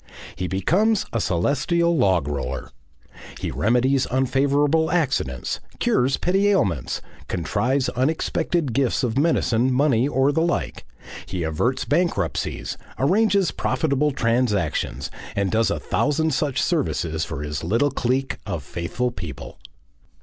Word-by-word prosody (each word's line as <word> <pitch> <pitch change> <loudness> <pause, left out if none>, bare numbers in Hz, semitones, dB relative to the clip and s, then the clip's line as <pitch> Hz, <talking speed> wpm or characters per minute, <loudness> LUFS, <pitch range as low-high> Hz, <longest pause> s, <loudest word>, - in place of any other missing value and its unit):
He 90 - -3
becomes 185 - +2
a 115 - 0
celestial 170 - +1
log 95 - +2
roller. 70 -3 -4 0.7
He - - -3
remedies 125 +4 +2
unfavourable 140 +5 +2
accidents, 135 - -1 0.2
cures 130 +2 +2
petty 195 +3 +2
ailments, 95 - 0 0.2
contrives 125 - 0
unexpected 150 +1 0
gifts 130 -1 +1
of 120 -2 0
medicine, 130 -6 +2
money, 130 -2 +3
or 135 0 +2
the 160 +3 +1
like, 75 - -2 0.4
he 90 -3 -3
averts 120 +12 0
bankruptcies, 170 +4 -1 0.2
arranges 195 +5 +3
profitable 150 -2 0
transactions, 115 - 0 0.2
and 100 -1 0
does 110 +1 +2
a - - -1
thousand 155 +2 0
such 135 -1 0
services 85 - 0
for 75 -3 -5
his 75 0 -4
little 115 - +1
clique 135 +1 -1
of - - -4
faithful 120 +9 -3
people. 85 - -8
130 Hz, 120 wpm, -23 LUFS, 95-150 Hz, 0.7 s, money